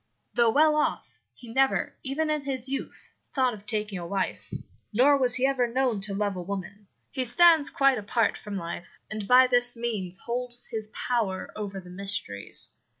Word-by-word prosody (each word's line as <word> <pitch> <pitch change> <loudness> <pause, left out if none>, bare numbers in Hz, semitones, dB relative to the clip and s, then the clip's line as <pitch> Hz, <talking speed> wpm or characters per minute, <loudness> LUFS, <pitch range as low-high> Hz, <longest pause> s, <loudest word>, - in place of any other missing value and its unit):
"'Though 235 -1 +4
well 305 +5 +4
off, 305 - -1
he 245 - -15
never, 270 +1 +2
even 305 +4 -1
in 305 -1 0
his 265 -2 -3
youth, 275 +1 -6 0.2
thought 260 -3 +2
of 205 -1 -12
taking 210 -3 -1
a 170 - -6
wife; 195 +1 -3 0.4
nor 260 +6 +5
was 255 -3 +2
he 255 +1 +2
ever 265 -3 +2
known 240 -3 0
to 200 0 0
love 205 -1 -1
a 180 - -4
woman. 200 +2 -6 0.2
He 260 - -2
stands 320 +4 +5
quite 275 -3 +3
apart 210 +1 +1
from 205 0 -6
life, 170 -1 -7
and 215 -2 -4
by 255 +1 +7
this 245 -1 +4
means 205 -6 -2
holds 245 +2 -4
his 220 -2 -3
power 215 -4 -2
over 200 -2 -5
the 180 -1 -12
mysteries. 195 - -4
235 Hz, 180 wpm, -27 LUFS, 200-260 Hz, 0.4 s, by